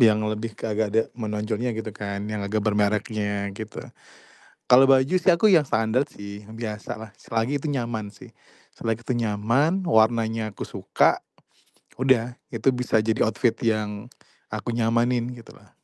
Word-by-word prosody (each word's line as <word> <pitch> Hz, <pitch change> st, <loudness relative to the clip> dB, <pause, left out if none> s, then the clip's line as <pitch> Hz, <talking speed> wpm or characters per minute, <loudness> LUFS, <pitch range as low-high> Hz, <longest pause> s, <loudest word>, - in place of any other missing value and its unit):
yang 110 Hz, -3 st, +6 dB
lebih 110 Hz, +1 st, -3 dB
ke -, -, -4 dB
agak 110 Hz, 0 st, 0 dB
ada 115 Hz, -, +5 dB
menonjolnya 110 Hz, +1 st, -2 dB
gitu 110 Hz, -1 st, -4 dB
kan, 100 Hz, -1 st, -4 dB
yang 105 Hz, -1 st, -3 dB
agak 105 Hz, +1 st, -1 dB
bermerknya 105 Hz, -1 st, 0 dB
gitu. 110 Hz, +1 st, -7 dB, 0.9 s
Kalau 130 Hz, +2 st, +8 dB
baju 135 Hz, +6 st, +4 dB
sih 185 Hz, -, +4 dB
aku 200 Hz, +5 st, +4 dB
yang 160 Hz, -5 st, +5 dB
standard 110 Hz, +5 st, +1 dB
sih, 100 Hz, 0 st, -9 dB
yang 110 Hz, -, -11 dB
biasa 110 Hz, -2 st, -5 dB
lah. 110 Hz, -2 st, -9 dB
Selagi 115 Hz, +5 st, -1 dB
itu 155 Hz, -, -4 dB
nyaman 115 Hz, -5 st, -2 dB
sih. -, -, -14 dB, 0.4 s
Selagi 115 Hz, +1 st, -3 dB
itu -, -, -3 dB
nyaman, 120 Hz, -, +1 dB
warnanya 110 Hz, -4 st, +2 dB
aku -, -, -5 dB
suka, -, -, +2 dB, 0.8 s
udah 125 Hz, -2 st, +2 dB, 0.2 s
itu 115 Hz, +2 st, +2 dB
bisa 125 Hz, -2 st, +1 dB
jadi 110 Hz, 0 st, +1 dB
outfit 115 Hz, +2 st, +1 dB
yang 110 Hz, -1 st, -1 dB, 0.4 s
aku -, -, -4 dB
nyamanin 120 Hz, +1 st, +1 dB
gitu 115 Hz, -2 st, -13 dB
lah. -, -, -22 dB
110 Hz, 160 wpm, -25 LUFS, 105-120 Hz, 0.9 s, Kalau